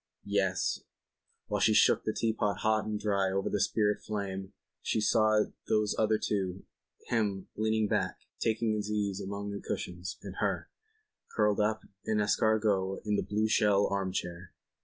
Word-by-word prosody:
Yes, 95 -3 +1 0.7
while 105 -1 -2
she 110 +1 +4
shook - - +5
the 110 - +1
teapot 110 -3 0
hot 110 0 +2
and 105 -1 -2
dry 100 -2 +1
over 95 0 -1
the 105 - +1
spirit 105 +1 +1
flame 95 -2 -4 0.3
she - - 0
saw 110 0 +4 0.2
those 105 -1 +2
other 110 0 +2
two, 95 -3 -2 0.4
him, 100 -5 0
leaning 110 0 +1
back, - - -1 0.2
taking 110 0 +1
his 105 -1 -2
ease 100 -2 -1
among 100 +1 -4
the 100 - -5
cushions, 90 +1 -4
and - - -8
her, - - -1 0.6
curled 105 -1 +3
up 110 +1 +1 0.2
en 110 - +1
escargot 105 -2 +2
in 105 -1 +1
the - - +1
blue 105 +1 0
shell 105 -2 +4
arm 95 -1 0
chair. 90 -1 -5
105 Hz, 160 wpm, -31 LUFS, 100-110 Hz, 0.7 s, shook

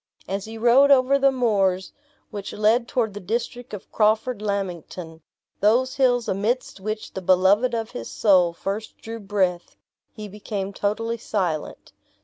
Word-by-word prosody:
As 195 +1 -3
he 225 +1 -8
rode 245 +5 +5
over 275 0 +5
the 275 0 +4
moors 200 -7 0 0.4
which 205 -2 -6
led 225 +3 +2
toward 225 -5 -1
the 205 - -6
district 235 +5 -4
of 205 -2 -9
Crawford 220 +2 +1
Lammington, 180 -5 -4 0.4
those 245 +5 +3
hills 245 -4 +2
amidst 210 +3 -1
which 215 +2 -5
the 190 - -5
beloved 190 +7 +3
of 225 -1 -3
his 115 - -7
soul 185 -5 +3
first 200 +5 -5
drew 225 +1 -8
breath, 195 -4 -1 0.4
he 215 -1 -8
became 200 -1 -5
totally 225 +4 -2
silent. 180 -9 -3
210 Hz, 145 wpm, -23 LUFS, 190-235 Hz, 0.4 s, rode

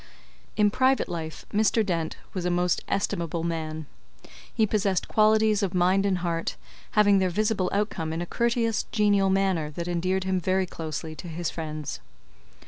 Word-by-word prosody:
In 210 -1 +4
private 260 +3 +2
life, 160 -2 -6
Mr. 215 +1 +3
Dent 165 -4 -2 0.2
was 185 - -3
a 180 - 0
most 175 0 +1
estimable 170 -4 -1
man. 160 -2 -3 0.7
He 220 - +2
possessed 200 -3 0
qualities 215 -1 +3
of 190 -2 -1
mind 185 +3 +3
and 190 -2 +1
heart, 165 -1 -1 0.4
having 205 -2 +5
their 185 -1 +2
visible 205 0 0
outcome 200 -6 -1
in 160 - -3
a 175 - -2
courteous, 230 +2 0
genial 205 -3 +3
manner 190 -5 +1
that 170 +3 -5
endeared 185 +2 0
him 190 0 0
very 185 +2 +1
closely 160 -2 -5
to 180 - -8
his 170 0 -3
friends. 155 - -5
185 Hz, 160 wpm, -26 LUFS, 170-205 Hz, 0.7 s, having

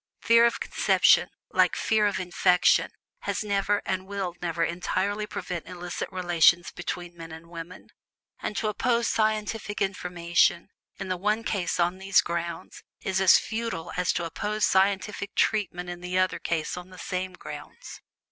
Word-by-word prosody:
Fear 230 0 +6
of 235 - -2
conception, - - +3 0.2
like - - +3
fear 215 -1 +2
of 200 - -1
infection, 180 0 +3 0.3
has - - -2
never, 205 0 0
and 190 0 -2
will 195 -3 -3
never 170 -1 -1
entirely 190 +5 -1
prevent 175 -5 -5
illicit 180 -1 -5
relations 175 -1 +3
between 175 0 -6
men 165 -1 -9
and 160 +1 -11
women; 170 +2 -9 0.5
and 210 - -4
to 220 - 0
oppose 235 +2 +1
scientific 215 -1 -1
information 175 -2 +1 0.3
in 195 - -5
the 185 - -1
one 210 +4 0
case 185 -6 -1
on 175 +2 +1
these 195 0 +4
grounds, 170 -1 -5 0.2
is 190 0 0
as 190 - +8
futile 225 -7 -4
as 180 0 +1
to 175 - -2
oppose 210 +6 -1
scientific 200 +1 +1
treatment 180 -4 0
in 175 0 -7
the 180 +1 -2
other 185 0 +1
case 160 -3 -2
on 180 +1 -9
the 185 - -13
same 185 0 -4
grounds. 150 -3 -10
185 Hz, 155 wpm, -27 LUFS, 175-205 Hz, 0.5 s, as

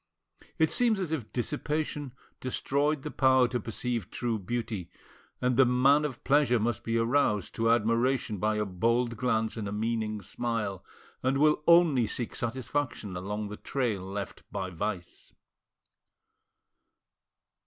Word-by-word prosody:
It 160 -1 +3
seems 235 -4 +3
as 180 -5 -2
if 140 -9 -3
dissipation 150 +1 -2 0.3
destroyed 140 +3 0
the 150 - -4
power 130 -2 +4
to 125 - -1
perceive 115 -1 -3
true 115 -3 -2
beauty, 110 -2 -4 0.5
and 125 -1 +1
the 135 - +8
man 135 +4 +4
of 130 -5 -5
pleasure 135 -4 +3
must 110 0 -1
be 115 0 0
aroused 115 -4 +1
to 115 0 +1
admiration 115 -1 +1
by 110 +2 +1
a 105 0 0
bold 115 +5 0
glance 110 -2 0
and 105 -2 -3
a - - -4
meaning 110 -1 -2
smile, 105 -3 -3 0.4
and 130 +1 +1
will 150 +1 +4
only 165 -9 +5
seek 120 +1 -3
satisfaction 120 -4 -3
along 105 +3 -4
the 105 - -7
trail 120 -8 -1
left 95 +1 -6
by 95 -2 -3
vice. 90 0 -5
120 Hz, 140 wpm, -29 LUFS, 105-135 Hz, 0.5 s, the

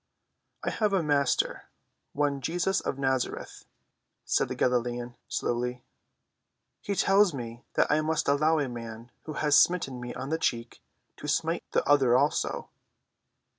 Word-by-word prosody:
"I - - -1
have 210 -3 0
a 185 -4 +2
Master, 145 -3 +1 0.5
one 140 -1 0
Jesus 175 +7 0
of - - -3
Nazareth," 130 -2 -2 0.6
said - - +1
the - - -4
Galilean 120 -1 0
slowly. 125 +1 -2 1.0
"He 200 - -2
tells 195 -2 +4
me 120 -2 -7
that - - +4
I 150 +1 +3
must 155 0 -1
allow 155 +3 +3
a 145 -3 0
man 115 -1 -8
who 155 - -5
has 150 -1 +4
smitten 135 -8 +1
me 120 0 -5
on 135 - -5
one 160 - 0
cheek 115 -5 -2 0.4
to - - -7
smite - - 0
the - - +1
other 135 -4 +5
also." 145 +3 0
140 Hz, 145 wpm, -28 LUFS, 125-155 Hz, 1.0 s, other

